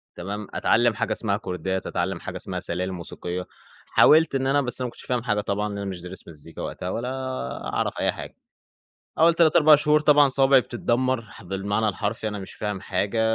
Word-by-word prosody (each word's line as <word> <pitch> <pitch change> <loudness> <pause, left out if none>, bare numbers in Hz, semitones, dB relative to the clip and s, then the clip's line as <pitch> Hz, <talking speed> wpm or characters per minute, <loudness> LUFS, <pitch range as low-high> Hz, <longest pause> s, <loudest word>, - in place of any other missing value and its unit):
تمام 100 +4 -5
أتعلّم 120 0 +3
حاجة 100 - -2
اسمها 100 -3 0
كوردات 95 -2 -3
أتعلّم - - -2
حاجة - - -6
اسمها - - -4
سلالم 90 +2 -3
موسيقية، 90 +1 -6 0.4
حاولت 160 -2 +5
إن 135 0 0
أنا 145 +1 +3
بس 125 -1 -3
أنا - - 0
ما - - -8
كنتش - - -11
فاهم 125 -2 -1
حاجة 105 -3 0
طبعًا، 105 +1 -2
لأن 100 - -5
أنا 100 - -4
مش 90 -2 -6
دارس 90 +2 -9
مزيكا 80 0 -10
وقتها، 90 - -5
ولا 120 +6 -3 0.6
أعرف - - -1
أي - - +2
حاجة، - - -9 0.8
أوّل 165 +1 +5
3 165 -2 +4
4 155 -1 +8
شهور 150 +1 +3
طبعًا 145 -1 +5
صوابعي 135 0 +5
بتتدّمر، 125 +1 -1
ح 105 - -14
بالمعنى 100 +4 -1
الحرفي، 105 +3 -2
أنا 105 -1 -5
مش 95 - -9
فاهم 105 -2 -4
حاجة، 100 +5 -1
105 Hz, 200 wpm, -24 LUFS, 95-130 Hz, 0.8 s, 4